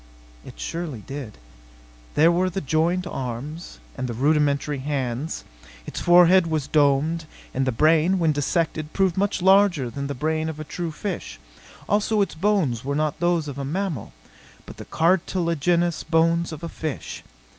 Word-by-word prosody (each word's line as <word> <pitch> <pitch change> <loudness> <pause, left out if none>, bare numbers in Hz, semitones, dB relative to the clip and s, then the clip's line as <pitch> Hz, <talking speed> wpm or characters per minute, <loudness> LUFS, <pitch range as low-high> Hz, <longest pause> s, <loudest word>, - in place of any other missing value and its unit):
It - - -12
surely 155 - -4
did. 135 -6 -7 0.8
There 160 +3 +5
were 180 +2 +1
the 185 - -3
jointed 170 +4 0
arms, 130 - -6 0.2
and 130 - -3
the 120 - -4
rudimentary 145 +1 +1
hands. 135 +1 -3 0.4
Its - - -5
forehead 175 0 +6
was 155 -3 -1
domed; 155 +3 +2 0.3
and 135 0 0
the - - +2
brain, 160 +8 +3
when 165 -3 +2
dissected, 155 +1 -1
proved 190 -3 +2
much 195 -2 0
larger 190 -9 +4
than 140 +4 -4
the 140 - -4
brain 155 +4 -1
of 155 -1 -7
a - - -4
true 170 +2 -4
fish. 160 - -5 0.5
Also 210 +1 +1
its 200 - 0
bones 160 - 0
were 140 +2 -2
not 155 0 -1
those 175 -2 +1
of 140 -1 -6
a - - -3
mammal, 160 - -3 0.5
but - - -11
the - - -9
cartilagenous 170 -1 +1
bones 165 +1 +2
of 155 0 -8
a - - -3
fish. 155 -4 -5
160 Hz, 160 wpm, -24 LUFS, 140-175 Hz, 0.8 s, forehead